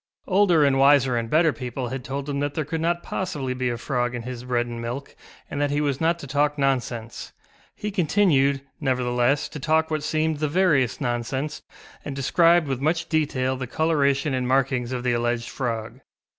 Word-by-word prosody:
Older 185 -5 +4
and 135 -1 +2
wiser 135 -2 +5
and 115 -1 -2
better 160 +1 +3
people 125 -1 -5
had 130 0 -5
told 140 +2 -4
him 140 -1 -2
that 145 0 -2
there 155 - -1
could 160 +2 -3
not 170 +1 0
possibly 145 -9 -3
be 125 -1 -1
a 120 - -2
frog 120 -1 -1
in 120 - -5
his 125 0 -6
bread 120 -1 0
and 120 -1 -6
milk 120 +4 -6 0.3
and 145 - -4
that 145 - +1
he 145 +1 0
was 145 -2 -1
not 165 +1 +2
to 170 - -9
talk 145 +2 0
nonsense; 125 -4 -2 0.4
he 210 - -4
continued, 155 -7 +2 0.2
nevertheless, 125 0 +1
to 150 - -7
talk 160 +3 +1
what 155 -1 0
seemed 155 0 0
the 155 - 0
veriest 150 -7 +2
nonsense, 130 +4 -2 0.4
and 145 - -5
described 165 +4 +3
with 135 -2 -2
much 165 +3 0
detail 130 -5 0
the 130 -1 -5
colouration 140 -1 +1
and 130 -1 -1
markings 130 -2 +1
of 125 -1 -3
the 125 -1 +1
alleged 120 0 -1
frog. 115 -4 -4
140 Hz, 195 wpm, -24 LUFS, 125-155 Hz, 0.4 s, wiser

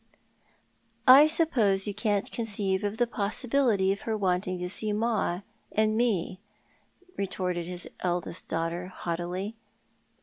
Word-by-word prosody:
" - - -41 0.3
I 275 +4 +10
suppose 235 - +2
you 205 - -3
can't 205 -1 0
conceive 205 -2 -1
the 240 - +3
possibility 225 -1 +1
of 200 - -9
her 220 -1 -2
wanting 185 -1 0
to 180 0 -3
see 210 +3 -1
ma 210 -5 0 0.3
and 215 0 +2
me," 200 -6 0 0.8
retorted 180 -3 -2
his 180 0 -5
eldest 175 -1 -3
daughter 165 +2 -2
haughtily. 180 +4 -4
200 Hz, 125 wpm, -28 LUFS, 180-220 Hz, 0.8 s, I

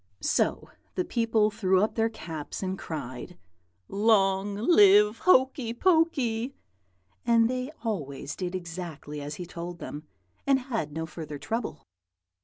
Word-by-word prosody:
"So - - +1 0.2
the 365 - 0
people 225 -3 +2
threw 190 -2 +2
up 215 - 0
their 225 0 +1
caps 165 -7 -6
and 190 0 -1
cried, 155 -1 -6 0.5
'Long 200 -1 +2
live 210 - +6
Hokey 260 -7 +3
Pokey!' 275 -8 +2 0.7
and 230 -1 +4
they 255 +2 -2
always 145 - -3
did 180 -1 -4
exactly 165 -4 -6
as 145 +1 -5
he 180 - -6
told 170 0 -7
them, 150 -1 -8 0.4
and 275 -1 +5
had 235 - -3
no 160 +2 -3
further 155 -2 -7
trouble. 225 - -4
200 Hz, 130 wpm, -28 LUFS, 165-230 Hz, 0.7 s, live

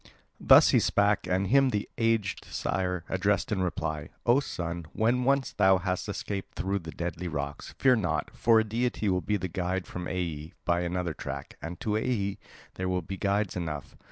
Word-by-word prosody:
Thus - - +7
he - - +5
spake, 100 0 +2
and 95 +2 +1
him 135 +6 +4
the 105 -3 -1
aged 115 -3 0
sire 90 -2 -2
addressed 100 +3 0
in 100 -3 +1
reply: 80 -3 -2 0.2
"O 120 +3 +5
son, 85 - -4
when 120 +3 +2
once 135 0 +2
thou 95 -2 +5
hast 90 +2 -2
escaped 100 -1 -4
through 95 +4 -1
the 80 -3 -9
deadly 85 +1 -4
rocks, 75 -2 -5
fear 130 -2 +5
not; 95 -9 -1
for 115 -1 +5
a - - +3
deity 115 -1 -1
will 90 -1 +1
be 105 +2 0
the 95 - -3
guide 90 +1 -2
from 90 -1 -6
Aea 85 -3 -4
by 85 0 +2
another 90 -1 -2
track; - - -6
and 85 +3 -6
to 110 - -1
Aea 105 -3 0 0.4
there 95 - 0
will 90 -1 0
be 95 +4 -5
guides 100 0 0
enough. 80 -5 -4
95 Hz, 185 wpm, -28 LUFS, 85-105 Hz, 0.4 s, Thus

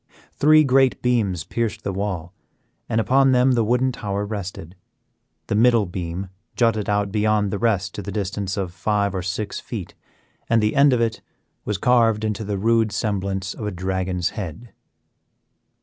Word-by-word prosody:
Three 155 +2 +5
great 135 -1 +3
beams 105 -9 +1
pierced 115 +2 -3
the 100 - -2
wall, 95 -3 -3 0.6
and 110 - +1
upon 135 +3 +4
them 125 +1 +4
the 120 -2 +2
wooden 125 +4 +2
tower 100 -3 -3
rested. 95 -4 -6 0.7
The - - -3
middle 115 0 +4
beam 90 +1 -5 0.3
jutted 115 -4 +1
out 105 -1 0
beyond 105 -1 +1
the 100 - -2
rest 100 -4 0
to - - -5
the 100 +1 -6
distance 100 0 -3
of 95 -3 -3
five 100 +2 0
or 95 - -2
six 100 +3 -3
feet, - - -7 0.6
and 115 - +4
the 105 0 +1
end 140 +1 +6
of 125 -2 +2
it 115 -1 -1 0.4
was 105 - -1
carved 115 -1 +3
into 110 0 -2
the 100 -1 -3
rude 110 +1 +2
semblance 100 -2 -2
of 105 - -5
a - - -2
dragon's 95 -1 -2
head. 105 +4 -7
105 Hz, 165 wpm, -22 LUFS, 95-115 Hz, 0.7 s, end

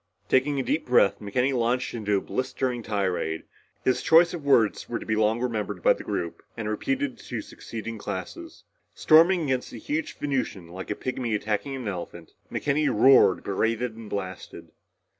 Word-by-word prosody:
Taking 140 +2 +2
a - - 0
deep 155 - -1
breath 125 -5 +4
McKenny 125 +6 0
launched 125 +1 0
into 105 -3 0
a - - -1
blistering 130 -1 -2
tirade. 95 -7 -2 0.4
His 130 - +1
choice 170 +2 +5
of 170 -4 -5
words 120 -7 +2
were 120 - -1
to - - -8
be 110 - 0
long 110 +1 +2
remembered 105 -7 -3
by - - +6
the - - -9
group 85 - -4 0.2
and 110 -2 -3
repeated 265 - -2
to 120 - -5
succeeding 115 0 -7
classes. 95 -2 -7 0.3
Storming 170 +3 +5
against 130 -3 -1
the - - -9
huge 305 +1 -3
Venusian 130 -11 -2
like 95 +2 -8
a 105 - -1
pygmy 125 -2 -2
attacking 110 +6 -2
an 130 -4 -5
elephant, 85 -3 -6 0.2
McKenny 145 +1 +1
roared, 130 +5 +5
berated 115 +4 -1
and 115 -2 -10
blasted. 95 -2 -6
115 Hz, 170 wpm, -26 LUFS, 105-135 Hz, 0.4 s, by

